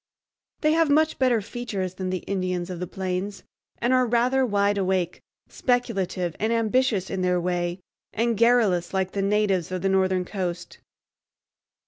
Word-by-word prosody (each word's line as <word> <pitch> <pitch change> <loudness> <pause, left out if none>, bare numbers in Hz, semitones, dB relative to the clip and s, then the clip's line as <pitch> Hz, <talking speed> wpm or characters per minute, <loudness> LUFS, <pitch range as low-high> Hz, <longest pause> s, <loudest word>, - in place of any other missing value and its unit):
They 305 - +3
have 325 -1 +3
much 310 +2 +2
better 250 -4 +3
features 200 -5 -4
than 185 0 -4
the 185 -1 -3
Indians 185 -2 -2
of 175 - -6
the 180 - -4
plains, 190 +2 -4 0.3
and 240 +2 +1
are 255 -1 +3
rather 245 +3 +2
wide 205 -3 +1
awake, 185 -2 -1 0.3
speculative 195 -9 -1
and 220 +2 0
ambitious 230 -3 +1
in 190 - -2
their 180 -1 +2
way, 175 0 -2 0.3
and 230 +1 0
garrulous, 215 -6 +3
like 190 -1 0
the 200 - -2
natives 195 -3 +1
of 185 -1 -3
the 195 - +2
northern 190 -1 +2
coast. 180 -2 -5
195 Hz, 155 wpm, -25 LUFS, 185-235 Hz, 0.3 s, They